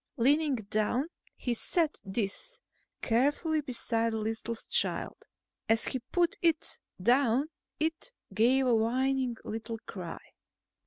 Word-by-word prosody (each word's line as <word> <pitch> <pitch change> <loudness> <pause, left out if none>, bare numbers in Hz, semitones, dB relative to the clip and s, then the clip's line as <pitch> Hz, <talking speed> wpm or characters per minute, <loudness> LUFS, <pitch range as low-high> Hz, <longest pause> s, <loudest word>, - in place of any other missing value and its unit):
Leaning 285 +4 +4
down, 215 +4 0 0.3
he 245 - -1
set 315 +6 +1
this 200 - -2 0.4
carefully 290 +6 +2
beside 230 -4 -1
the - - -1
listless 225 +1 -3
child. - - -1 0.4
As 225 0 +4
he 260 - -1
put 345 +7 0
it 330 -2 +1 0.2
down, 250 +6 +3 0.3
it 320 +9 -1 0.2
gave 255 +4 +4
a 250 - +4
whining 255 +2 +1
little 225 +1 -4
cry. 180 -4 -6
245 Hz, 115 wpm, -30 LUFS, 225-290 Hz, 0.4 s, Leaning